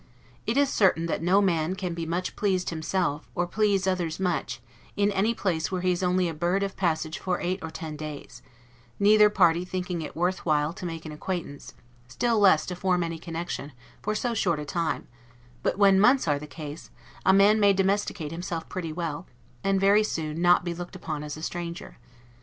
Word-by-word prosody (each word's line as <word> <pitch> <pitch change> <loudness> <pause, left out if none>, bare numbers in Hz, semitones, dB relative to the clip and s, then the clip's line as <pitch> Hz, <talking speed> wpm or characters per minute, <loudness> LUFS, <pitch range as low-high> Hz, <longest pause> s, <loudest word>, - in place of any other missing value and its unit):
It 230 +4 0
is 280 -1 +3
certain 180 -5 +3
that 165 - -2
no 185 +4 +4
man 170 -1 +1
can 185 -3 -3
be 165 -1 -4
much 180 +3 -2
pleased 190 -4 0
himself, 160 -1 -2
or 175 - +1
please 200 0 +1
others 180 -3 -1
much, 175 -9 -1 0.4
in 205 0 +2
any 210 +4 +1
place 175 -6 -1
where 185 -1 -1
he 185 0 +2
is 175 - -1
only 180 0 +2
a 165 - -3
bird 175 +5 0
of 195 -1 -3
passage 160 -3 -1
for 185 -2 -1
eight 185 +2 -2
or 160 - -5
ten 160 -2 -7
days; 145 -4 -8 0.6
neither 210 +1 +6
party 175 -4 +3
thinking 180 -1 -3
it 155 - -7
worth 180 +2 0
while 150 -1 +1
to 180 - -6
make 165 -1 -6
an 155 - -6
acquaintance, 150 -2 -5 0.3
still 225 - 0
less 185 -7 +5
to 180 - -4
form 180 -1 +1
any 165 -1 -4
connection, 165 -3 -5 0.3
for 215 - -2
so 240 +2 -1
short 175 -7 +1
a 150 - -5
time; 165 +1 -2 0.5
but - - 0
when 195 -2 +5
months 250 +1 +4
are 145 -1 +2
the 150 - -9
case, 150 0 -8 0.3
a - - +5
man 200 +3 +5
may 205 -1 +6
domesticate 195 -5 0
himself 170 -1 -4
pretty 170 -4 -4
well, 165 0 -4 0.4
and 195 0 +2
very 200 +2 +5
soon 160 -5 -3
not 175 0 +4
be 175 - -2
looked 175 +2 -8
upon 155 -5 -5
as 150 0 -6
a 155 - -9
stranger. 170 -4 -6
175 Hz, 200 wpm, -26 LUFS, 160-195 Hz, 0.6 s, neither